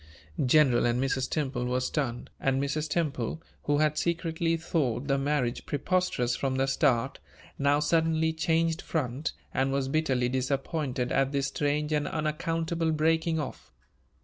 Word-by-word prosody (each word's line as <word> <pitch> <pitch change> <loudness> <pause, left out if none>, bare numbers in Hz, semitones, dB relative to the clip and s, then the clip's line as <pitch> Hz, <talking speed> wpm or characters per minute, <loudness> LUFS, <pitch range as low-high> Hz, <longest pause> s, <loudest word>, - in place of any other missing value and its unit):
General 130 -2 +4
and 120 +1 +1
Mrs. 130 0 0
Temple 135 -5 -1
were 125 +1 0
stunned; 125 -2 -2
and 135 0 +1
Mrs. 150 +3 -1
Temple, 150 -4 -1 0.3
who 145 0 +2
had 150 0 +2
secretly 165 0 0
thought 145 -7 -1
the 140 -1 +2
marriage 135 -3 -1
preposterous 145 -6 0
from 135 0 -1
the 135 0 +2
start, 135 -2 +1 0.4
now 140 +1 +3
suddenly 160 +1 +2
changed 165 0 +1
front, 145 -1 -2 0.2
and 135 0 +1
was 135 -1 0
bitterly 135 -5 +1
disappointed 130 0 -1
at 135 0 +2
this 140 -1 0
strange 150 +1 -1
and 150 -1 +1
unaccountable 165 +1 -1
breaking 160 +1 +1
off. 145 - -6
145 Hz, 145 wpm, -28 LUFS, 130-160 Hz, 0.4 s, General